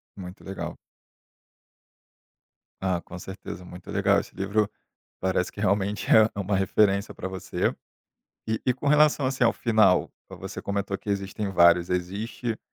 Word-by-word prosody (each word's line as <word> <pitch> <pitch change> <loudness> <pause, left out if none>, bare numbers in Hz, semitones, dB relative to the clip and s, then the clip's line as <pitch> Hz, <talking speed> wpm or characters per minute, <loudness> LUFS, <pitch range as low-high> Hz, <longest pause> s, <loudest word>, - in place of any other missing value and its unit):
Muito 90 -1 -9
legal. 95 0 -6 2.0
Ah, 95 -2 0
com 85 - -10
certeza, 95 0 -8
muito 90 0 -12
legal, - - +3
esse - - -10
livro 100 +2 0 0.5
parece 95 -1 0
que 105 - -8
realmente 100 0 0
é 110 0 +7
é - - -4
uma 100 +1 0
referência 100 +1 +2
pra - - -5
você. 95 -1 -2 0.7
E 110 0 -1
e 125 - +3
com 145 - -2
relação, 150 -1 +4
assim, 130 -1 +1
ao 115 - +4
final, 110 -6 +3 0.2
você - - -7
comentou 100 -1 -2
que - - -13
existem 100 +1 -2
vários, 85 -1 +5
existe, 105 +6 -3
100 Hz, 145 wpm, -26 LUFS, 95-110 Hz, 2.0 s, é